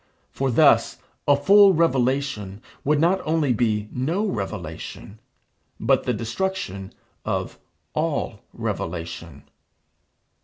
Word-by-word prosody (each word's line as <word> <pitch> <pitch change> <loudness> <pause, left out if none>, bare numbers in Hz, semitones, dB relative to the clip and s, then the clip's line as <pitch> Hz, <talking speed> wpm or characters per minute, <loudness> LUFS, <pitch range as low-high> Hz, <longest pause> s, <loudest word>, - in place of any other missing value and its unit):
For 135 0 -1
thus 120 - +4 0.3
a 145 - +6
full 195 +5 +6
revelation 130 - 0 0.2
would 150 +1 +2
not 175 +4 +3
only 155 -4 +1
be 110 -2 0
no 165 +12 -1
revelation, 105 - -6 0.6
but - - +2
the - - +1
destruction 115 - -3 0.3
of - - -3 0.3
all - - -2
revelation. 85 -2 -5
130 Hz, 100 wpm, -23 LUFS, 105-165 Hz, 0.6 s, a